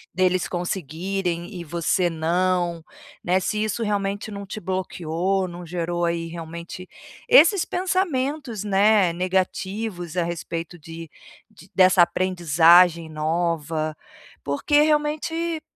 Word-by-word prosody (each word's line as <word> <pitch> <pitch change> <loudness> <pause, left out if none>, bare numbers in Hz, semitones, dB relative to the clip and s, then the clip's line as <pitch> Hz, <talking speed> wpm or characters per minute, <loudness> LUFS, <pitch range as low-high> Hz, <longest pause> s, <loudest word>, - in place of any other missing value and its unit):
deles 185 -1 +2
conseguirem 175 +1 -3
e - - -6
você 170 +3 0
não, 170 0 0 0.4
né, 185 +2 +2
se 210 +3 -1
isso 215 +2 -2
realmente 205 -1 -2
não 200 -1 -7
te 205 +3 -7
bloqueou, 185 0 -2
não 175 0 -9
gerou, 175 0 -2
aí, 170 0 -2
realmente 170 +2 -8 0.4
esses 410 -6 +6
pensamentos, 295 - -1
né, 205 -2 +3
negativos 185 0 -2
a 175 - +1
respeito 170 0 -5
de 165 0 -10 0.4
de 175 - -17
dessa 185 -1 +6
aprendizagem 170 -1 +4
nova, 155 -1 -2 0.5
porque 290 - +2
realmente 300 +1 0
e 330 -1 -2
180 Hz, 115 wpm, -23 LUFS, 170-200 Hz, 0.5 s, esses